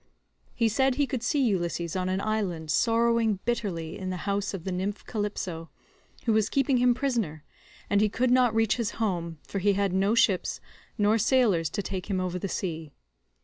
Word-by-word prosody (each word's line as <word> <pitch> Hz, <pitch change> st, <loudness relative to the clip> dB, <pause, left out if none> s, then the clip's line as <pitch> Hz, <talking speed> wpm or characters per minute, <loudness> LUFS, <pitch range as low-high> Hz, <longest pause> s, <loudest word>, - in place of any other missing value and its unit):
He 230 Hz, -, +2 dB
said 265 Hz, +4 st, +2 dB
he 285 Hz, +1 st, +2 dB
could 260 Hz, -3 st, -3 dB
see 275 Hz, +3 st, +1 dB
Ulysses 175 Hz, -6 st, -1 dB
on 185 Hz, 0 st, -1 dB
an 190 Hz, +1 st, -1 dB
island 190 Hz, -8 st, -2 dB
sorrowing 230 Hz, +1 st, +2 dB
bitterly 190 Hz, -9 st, -2 dB
in 185 Hz, -1 st, -4 dB
the 185 Hz, -, -3 dB
house 200 Hz, 0 st, -1 dB
of 195 Hz, -5 st, -6 dB
the 190 Hz, -, -3 dB
nymph 195 Hz, +3 st, -3 dB
Calypso, 190 Hz, -7 st, -4 dB, 0.6 s
who 230 Hz, -, +3 dB
was 215 Hz, 0 st, +2 dB
keeping 275 Hz, -1 st, +2 dB
him 245 Hz, 0 st, +4 dB
prisoner, 225 Hz, -, -2 dB, 0.4 s
and 205 Hz, 0 st, +2 dB
he 215 Hz, -, +3 dB
could 245 Hz, +4 st, +1 dB
not 250 Hz, -3 st, +4 dB
reach 225 Hz, 0 st, +2 dB
his 235 Hz, -3 st, -2 dB
home, 175 Hz, -7 st, -2 dB
for 200 Hz, -, -3 dB
he 200 Hz, +2 st, +3 dB
had 195 Hz, -1 st, 0 dB
no 195 Hz, +4 st, +2 dB
ships 195 Hz, -5 st, +2 dB, 0.4 s
nor 210 Hz, +1 st, +3 dB
sailors 215 Hz, -, +3 dB
to 205 Hz, +5 st, -3 dB
take 190 Hz, 0 st, -5 dB
him 190 Hz, -2 st, 0 dB
over 180 Hz, 0 st, -2 dB
the 195 Hz, -, -4 dB
sea. 160 Hz, -6 st, -4 dB
205 Hz, 190 wpm, -27 LUFS, 185-230 Hz, 0.6 s, him